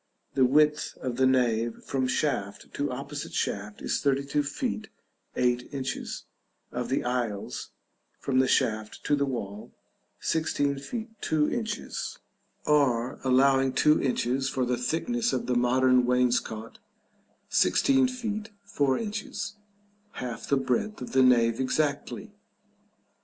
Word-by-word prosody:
The 130 - +4
width 150 +3 +3
of 125 -2 -2
the 130 0 +4
nave 120 -3 +1
from 130 -2 0
shaft 115 -8 -2
to 145 - -1
opposite 140 +3 -6
shaft 105 +1 -2
is - - 0
32 140 +1 +1
feet 140 -7 -3 0.5
8 125 0 +1
inches: 135 -2 -4 0.5
of 125 0 -3
the 135 - 0
aisles, 120 -5 -2 0.5
from 130 -1 +1
the 130 - +4
shaft 110 -3 0
to 145 - +2
the 140 -1 0
wall, 105 -5 -5 0.5
16 145 -3 0
feet 220 - -5
2 150 -1 +1
inches, 230 -2 -3 0.5
or 130 -5 +2
allowing 135 0 +4
2 150 +3 +4
inches 130 0 0
for 130 -1 0
the 125 0 +1
thickness 225 - -1
of - - -1
the 125 - 0
modern 125 +1 +4
wainscot, 120 -3 0 0.7
16 270 -1 +4
feet 225 -4 -4
4 145 -9 +1
inches, 220 0 -4 0.6
half 125 -2 -5
the 140 - +3
breadth 135 - -1
of - - -7
the 130 - +4
nave 115 -2 +4
exactly. 145 +2 -1
130 Hz, 130 wpm, -28 LUFS, 125-150 Hz, 0.7 s, The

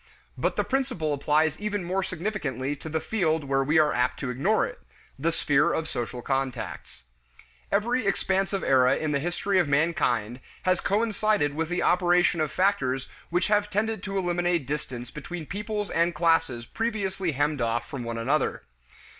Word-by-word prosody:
But - - -1
the - - +1
principle 250 - -1
applies 150 +2 +1
even 205 -2 -2
more 185 +2 0
significantly 155 - -3
to 150 +3 -8
the 160 +1 0
field 160 -6 0
where 135 0 +1
we 150 +4 +2
are 155 -1 +4
apt 125 - 0
to 130 -3 -2
ignore 175 - +2
it - - -8 0.4
the 165 +4 +1
sphere 150 0 +2
of 160 -1 -1
social 120 -3 -4
contacts. 130 - -3 0.7
Every 225 +3 +1
expansive 195 0 0
era 130 -1 +4
in 155 -1 -2
the 140 - +1
history 175 +5 0
of 175 - +2
mankind 130 -6 +1 0.2
has 185 -1 +2
coincided 210 -6 +1
with 160 +2 -2
the 175 - 0
operation 175 -2 +3
of 155 - 0
factors 135 -10 +1 0.2
which 175 +1 +1
have 210 0 +2
tended 215 0 -1
to 195 -1 -3
eliminate 175 -3 0
distance 125 -4 -5
between 160 +2 -6
peoples 210 +3 -4
and 170 0 +1
classes 165 -8 +2
previously 195 - -2
hemmed 145 0 0
off 115 +1 0
from 130 -3 -5
one 115 0 -4
another. 135 +7 0
165 Hz, 165 wpm, -26 LUFS, 140-195 Hz, 0.7 s, are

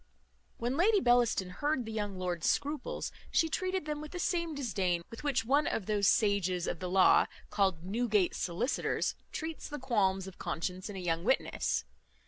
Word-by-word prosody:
When 245 +4 -1
Lady 410 +5 +5
Bellaston 240 - +3
heard 290 +5 -1
the 220 - -6
young 205 -3 -3
lord's 180 -2 -1
scruples, 295 +1 -2 0.2
she 325 - +3
treated 370 +1 -1
them 300 -1 -3
with 305 +2 -9
the - - -4
same 340 -3 -1
disdain 190 -10 -1
with 230 - -9
which 265 -5 +1
one 285 +5 +3
of 205 - -1
those 205 -1 +2
sages 190 -5 +2
of - - -3
the 180 - -4
law, 185 0 +5 0.2
called 190 -5 +1
Newgate 210 -1 +1
solicitors, 210 - -1 0.2
treats 320 0 -5
the 295 - -4
qualms 200 -8 +1
of 190 -1 -11
conscience 180 +4 -3
in 205 - -6
a - - -4
young 170 -2 -1
witness. 260 +6 0
220 Hz, 175 wpm, -32 LUFS, 185-290 Hz, 0.2 s, Lady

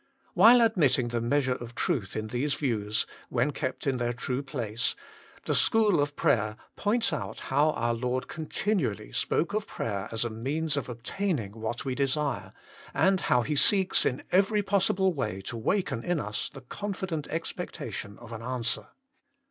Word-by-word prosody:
While 230 +6 +8
admitting 155 - +3
the 120 0 -1
measure 130 +2 +2
of 120 -1 -8
truth 100 -6 -1
in 110 0 -3
these 135 +5 0
views, 110 -6 0 0.2
when 125 +4 +1
kept 130 -2 -3
in 135 -2 +1
their 120 0 0
true 125 +2 -2
place, 125 -4 -2 0.5
THE - - +1
SCHOOL 215 -8 +4
OF 145 0 -1
PRAYER 110 -9 +2 0.2
points 225 +3 +1
out - - -4
how 150 +2 +4
our 120 0 0
Lord 125 +2 -1
continually 155 - -2
spoke 150 +8 0
of 215 0 -1
prayer 100 -2 -3
as 115 +1 +1
a 120 - -2
means 140 +7 -1
of 140 -2 -2
obtaining 125 - -2
what 115 +3 -4
we 130 - -1
desire, 140 +1 -1 0.4
and 190 0 +4
how 125 -6 +2
He 150 +5 -1
seeks 190 +5 +4
in 125 - 0
every 200 +3 +3
possible 190 -1 +2
way 110 - -2
to 120 +5 -6
waken 135 - 0
in 175 -2 0
us 105 0 -3
the 135 - -10
confident 185 - -4
expectation 150 -9 -5
of 120 -1 -12
an 115 -1 -6
answer. 120 -1 -1
130 Hz, 165 wpm, -28 LUFS, 115-170 Hz, 0.5 s, While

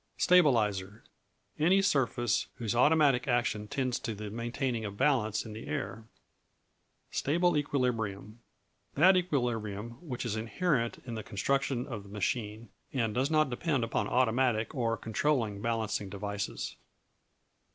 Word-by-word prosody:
Stabilizer 110 - +3 0.6
Any 175 +6 +5
surface 120 - +1
whose 115 -1 -2
automatic 140 -1 +4
action 120 -4 0
tends 130 +1 -1
to 110 - -4
the 105 0 -6
maintaining 120 +1 -2
of 100 -1 -6
balance 115 -7 +1
in 110 - -8
the 110 - -8
air. 95 +8 -4 1.1
Stable 175 +4 +2
Equilibrium 120 -7 -1 0.6
That 185 +6 +6
equilibrium 120 - -1
which 130 -8 -5
is 110 -3 -1
inherent 115 +2 0
in 120 - -5
the 110 - -4
construction 125 +5 -1
of 115 -7 -6
the 100 - -14
machine, 105 +2 -3 0.2
and 115 -5 0
does 130 +4 +1
not 155 -3 +2
depend 135 0 0
upon 115 - -1
automatic 120 -2 +2
or 115 -5 0
controlling 110 -2 0
balancing 110 -3 -1
devices. 100 0 -4
120 Hz, 130 wpm, -30 LUFS, 105-135 Hz, 1.1 s, That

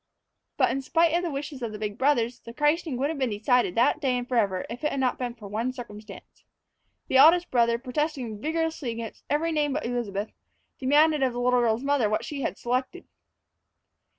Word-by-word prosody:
But, - - +3
in 275 - -2
spite 330 +4 +2
of 345 - +2
the 350 - -2
wishes 280 -1 -5
of 230 -2 -3
the 210 - -6
big 210 -1 -5
brothers, 245 -4 +1
the 230 - -12
christening 295 -1 +1
would 275 +3 0
have 315 - -5
been 260 -2 +1
decided 215 -1 +1
that 245 +6 +2
day 260 -3 +1
and 245 0 -4
forever 205 -7 0
if 240 +5 -8
it 300 - +2
had 275 - -3
not 255 -1 0
been 245 -2 -3
for 215 -4 -10
one 225 +5 -2
circumstance. 220 -4 -11 0.6
The 265 - +2
eldest 340 +5 +6
brother, 235 -2 +3
protesting 255 -4 -3
vigorously 320 -3 -2
against 230 -1 -6
every 315 +3 +1
name 295 -3 0
but 305 - -2
Elizabeth, 215 -4 -3 0.5
demanded 295 +3 +4
of 260 -2 +2
the 245 - -4
little 250 0 +3
girl's 235 +1 +1
mother 275 -6 +2
what 215 +2 -1
she 285 -2 -5
had - - -2
selected. 255 +9 -3
255 Hz, 205 wpm, -26 LUFS, 230-295 Hz, 0.6 s, eldest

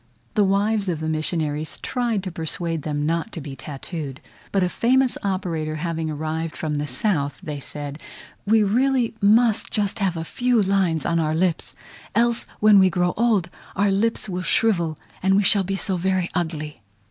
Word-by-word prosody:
The 210 - +3
wives 200 +1 +1
of 165 -3 -1
the 155 - -3
missionaries 155 -1 -2
tried 235 -6 -1
to 185 - -4
persuade 165 0 -2
them 145 0 -2
not 165 +7 -1
to - - -4
be 140 -2 -7
tattooed; 145 -1 -6 0.3
but 195 -2 +2
a - - +2
famous 255 +6 +2
operator 170 -6 -2
having 160 0 -2
arrived 155 +1 -3
from 155 -2 -2
the 145 0 -2
south, 140 - 0
they 150 -2 -4
said, 145 +1 -6 0.4
"We 215 +1 +4
really 245 +3 +2
must 220 +2 +4
just 205 0 0
have 190 -4 0
a 160 - -3
few 245 +7 +1
lines 190 -6 +1
on 170 - +1
our 155 -1 0
lips; 170 0 0 0.4
else 235 +1 +2
when 210 -1 +7
we 190 -1 +6
grow 180 -1 +1
old, 210 -6 +1 0.2
our 200 +1 +2
lips 215 +3 0
will 180 -2 -3
shrivel, 175 -6 +1 0.2
and 190 +1 +3
we 205 - +3
shall 195 0 +5
be 195 +1 -2
so 195 -1 -1
very 185 0 0
ugly." 155 -5 -3
180 Hz, 180 wpm, -23 LUFS, 155-205 Hz, 0.4 s, when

